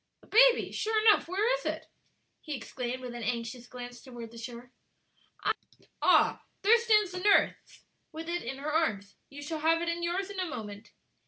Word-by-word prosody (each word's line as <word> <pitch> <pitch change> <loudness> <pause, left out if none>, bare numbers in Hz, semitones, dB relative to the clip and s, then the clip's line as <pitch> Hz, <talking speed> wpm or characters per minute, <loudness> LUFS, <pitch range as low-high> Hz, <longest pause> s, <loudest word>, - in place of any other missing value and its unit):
"The - - -19
baby! - - +5
Sure 440 0 0
enough, 425 -6 +5
where 390 +5 0
is - - -12
it?" - - -3 0.6
he 305 -3 -5
exclaimed, 255 +1 -5
with 245 -1 -6
an 240 - -6
anxious 235 +1 -3
glance 245 -1 -9
toward 240 -3 -9
the 230 - -12
shore. 240 +1 -9 1.3
"Ah, - - +4 0.2
there 455 +4 +6
stands 425 -4 +3
the 365 - -5
nurse 405 +2 +2 0.3
with 320 0 -7
it 345 +1 -2
in 265 +3 -5
her 290 +2 -4
arms. 205 -11 0
You 285 +1 -9
shall 315 +2 -4
have 325 +2 +3
it 340 - -1
in 340 0 -2
yours 370 +3 -2
in 395 - -6
a 370 - -1
moment." 210 -4 -7
300 Hz, 185 wpm, -30 LUFS, 240-370 Hz, 1.3 s, there